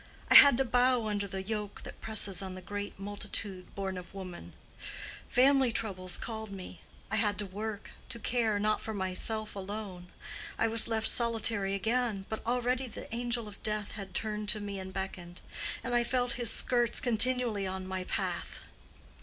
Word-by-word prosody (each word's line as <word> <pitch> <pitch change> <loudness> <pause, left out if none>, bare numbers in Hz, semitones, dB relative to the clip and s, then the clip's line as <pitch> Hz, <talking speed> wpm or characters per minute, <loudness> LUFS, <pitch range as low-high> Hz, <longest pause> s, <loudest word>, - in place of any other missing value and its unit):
I - - +8
had 280 -4 +10
to 270 - +3
bow 245 -1 +3
under 205 -1 -1
the 190 0 -4
yoke 210 0 -4
that - - -10
presses 200 -4 +1
on 190 -1 -5
the - - -7
great 205 +2 -5
multitude 200 -1 -5
born 190 -2 -3
of 180 +2 -12
woman: 180 - -8 0.8
family 265 0 +5
troubles 185 -5 -2
called 220 -2 -5
me—I 195 +3 -7
had 210 -1 +2
to 210 - 0
work, 210 +2 -5 0.2
to - - -4
care, 225 -1 +1
not 215 +1 +1
for 220 - -4
myself 210 +3 -2
alone. 195 -2 -5 0.5
I 225 - +3
was 225 0 +3
left 220 -1 +2
solitary 225 -4 +3
again; 220 0 0
but 220 - -4
already 250 +1 +1
the 230 - -8
angel 240 -1 -1
of 205 -1 -11
death 210 -1 -1
had 195 -3 -8
turned 210 -1 -1
to 215 - +4
me 200 -1 -4
and 190 0 -6
beckoned, 185 -2 -5 0.4
and 245 - -2
I 240 0 +4
felt 245 0 +1
his 240 -2 -1
skirts 240 0 +2
continually 240 -4 +2
on 190 0 -4
my 185 0 -3
path. - - -3
210 Hz, 170 wpm, -31 LUFS, 195-235 Hz, 0.8 s, had